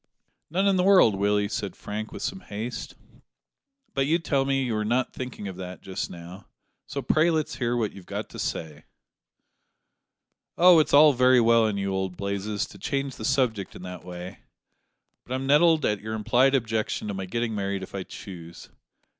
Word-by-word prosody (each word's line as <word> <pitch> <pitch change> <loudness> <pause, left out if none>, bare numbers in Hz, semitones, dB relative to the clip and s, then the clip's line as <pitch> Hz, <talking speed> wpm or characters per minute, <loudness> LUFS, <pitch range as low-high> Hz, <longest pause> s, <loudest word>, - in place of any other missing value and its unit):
"None 185 +5 +1
in 195 -1 +3
the 180 - +2
world, 185 - +6
Willie," 100 +1 +1
said 100 -1 -4
Frank, 110 +1 -6
with - - -7
some 190 - -3
haste, 115 - -6 1.0
"but 135 0 +1
you 165 +3 +3
tell 140 -5 0
me 135 0 +1
you 120 -4 -1
are 105 - 0
not 120 +4 0
thinking 125 -5 -6
of 95 -2 -7
that 90 0 -8
just 95 -1 -4
now; 90 +3 -11 0.4
so - - -4
pray 155 +2 +3
let's 155 -1 -1
hear 120 -1 0
what 110 -3 0
you've 95 -3 -13
got - - -4
to - - -10
say." 75 -2 -4 1.7
"Oh! 175 -1 +7
it's 155 - +1
all 150 0 +8
very 125 0 +5
well 115 -1 +4
in 105 -2 -2
you, 100 -1 -2
old 95 -2 -3
Blazes, 100 +1 -2
to - - -13
change 135 -2 -3
the 110 - -5
subject 125 -7 0
in - - -10
that 90 0 -8
way, 90 +1 -8 0.8
but 125 - -4
I'm 130 +1 -3
nettled 155 +3 +4
at 105 -2 0
your 110 +1 -4
implied 125 +5 +3
objection 110 -4 -1
to - - -2
my 95 -1 -5
getting 115 +3 -2
married 100 -2 -2
if - - -10
I 100 - -3
choose. 85 -3 -10
110 Hz, 190 wpm, -26 LUFS, 100-135 Hz, 1.7 s, all